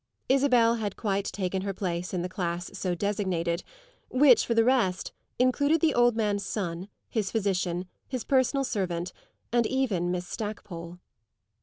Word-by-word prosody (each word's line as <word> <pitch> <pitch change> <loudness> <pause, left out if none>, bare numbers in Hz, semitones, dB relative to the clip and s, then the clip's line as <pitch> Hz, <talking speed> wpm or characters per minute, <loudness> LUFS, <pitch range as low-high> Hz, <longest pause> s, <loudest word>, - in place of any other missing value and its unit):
Isabel 250 -4 +4
had 210 -3 -3
quite 200 -2 -1
taken 190 -1 -2
her 195 0 -3
place 180 -2 -3
in 180 -2 -2
the - - -1
class 175 -2 -3
so 185 -2 -1
designated, 185 -3 -1 0.5
which, 255 -3 +5
for 235 - +1
the 225 - +5
rest, 225 -7 +1 0.3
included 285 +5 +3
the 310 -1 +3
old 240 -1 +4
man's 205 -3 0
son, 185 -2 -3 0.2
his 210 -4 -1
physician, 185 -4 -1 0.2
his 255 -3 -3
personal 270 +1 +2
servant, 180 -7 -2 0.4
and 240 -2 +3
even 220 -10 0
Miss 180 0 -2
Stackpole. 180 -6 -6
200 Hz, 150 wpm, -28 LUFS, 180-240 Hz, 0.5 s, which